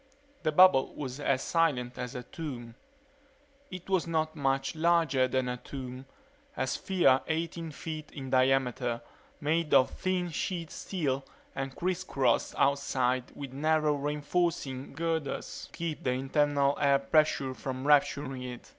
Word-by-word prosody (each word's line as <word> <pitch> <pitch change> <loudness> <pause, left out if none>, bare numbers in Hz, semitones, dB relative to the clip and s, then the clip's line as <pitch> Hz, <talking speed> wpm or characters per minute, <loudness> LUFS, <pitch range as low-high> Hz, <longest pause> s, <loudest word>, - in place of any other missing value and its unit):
The 155 - +1
bubble 180 -4 +6
was 130 -1 -5
as 135 -2 +1
silent 140 -8 +1
as 125 +1 -5
a 125 - -5
tomb. 125 -5 -7 1.0
It 185 -1 -8
was 190 -3 +1
not 160 -1 0
much 135 -2 0
larger 160 -5 +3
than 130 0 0
a 125 0 -2
tomb; 130 0 -8 0.5
a 130 - +1
sphere 140 -1 +3
eighteen 165 +1 -2
feet 155 0 -6
in 135 -3 -7
diameter, 130 -2 +2 0.4
made 155 +1 +1
of 130 - +5
thin 180 -2 -1
sheet 165 0 -3
steel 140 -8 -2 0.3
and 135 0 -4
criss 180 0 -1
crossed 130 -4 +1
outside 130 -3 +1
with 140 -2 -7
narrow 155 +1 +2
reinforcing 145 -1 -1
girders 160 -1 -3
to - - -13
keep 165 -3 -4
the 125 - +1
internal 140 +1 +2
air 140 -1 +5
pressure 140 -2 +2
from 130 +3 -5
rupturing 140 -2 +2
it. 125 -1 -8
140 Hz, 140 wpm, -30 LUFS, 130-160 Hz, 1.0 s, bubble